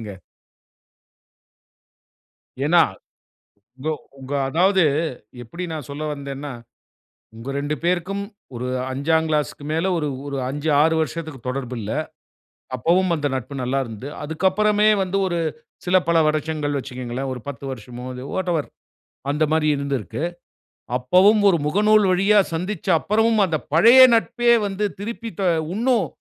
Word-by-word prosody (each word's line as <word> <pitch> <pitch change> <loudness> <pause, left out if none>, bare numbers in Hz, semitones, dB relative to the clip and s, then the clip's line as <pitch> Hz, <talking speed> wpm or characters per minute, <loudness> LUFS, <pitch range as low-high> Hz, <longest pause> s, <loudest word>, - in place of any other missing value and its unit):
நடக்குதுங்க. 105 -3 -7 2.5
ஏனா, 170 +2 +6 1.0
கோ 155 - +1 0.3
உங்க 135 +2 -8 0.2
அதாவது, 185 +5 +3 0.6
எப்படி 170 +10 -7
நான் 150 -5 -6
சொல்ல 145 +2 -6
வந்தேன்னா, 140 0 -6 0.8
உங்க 115 +4 -8
ரெண்டு 145 +2 -2
பேருக்கும், 180 +3 0 0.3
ஒரு 125 +2 -4 0.2
5 160 +4 +1
கிளாஸ்க்கு 150 -1 -1
மேல, 165 +3 0
1 150 -2 -1 0.2
ஒரு 140 -1 -4
5, 145 +3 -3
6 160 +1 +3
வருஷத்துக்கு 160 -3 -4
தொடர்பு 130 -1 -4
இல்ல. 105 0 -5 0.8
அப்பவும் 170 +8 +2
அந்த 145 -2 -1
நட்பு, 130 +2 -5
நல்லா 130 +2 0
இருந்தது. 115 +5 -8
அதுக்கு 160 +5 0
அப்புறமே 210 +2 +3
வந்து, 190 +1 -2
ஒரு 175 -2 -1 0.5
சில 185 +1 +4
பல 170 - +3
வருஷங்கள் 155 -1 -1
வச்சுக்கோங்களேன். 130 0 -5
ஒரு 125 - -8
10 140 -1 -6
வருஷமோ, 125 +1 -8
அது 125 +1 -7
வாட்டெவர். 175 -5 -1 0.6
அந்த 150 +2 +1
மாரி 160 -1 +2
இருந்திருக்கு. 140 - -3 0.7
அப்பவும் 185 - +4
ஒரு 175 - +4
முகநூல் 210 +6 +4
வழியா 195 +3 +4 0.2
சந்திச்ச 180 +3 -4
அப்புறமும், 220 +1 +2
அந்த 160 -3 -1 0.2
பழைய 235 +10 +8
நட்பே 235 +1 +3
வந்து 200 +1 -2 0.2
திருப்பி, 230 +2 -5
த - - 0 0.3
இன்னும் 230 -4 +2
160 Hz, 130 wpm, -22 LUFS, 140-190 Hz, 2.5 s, பழைய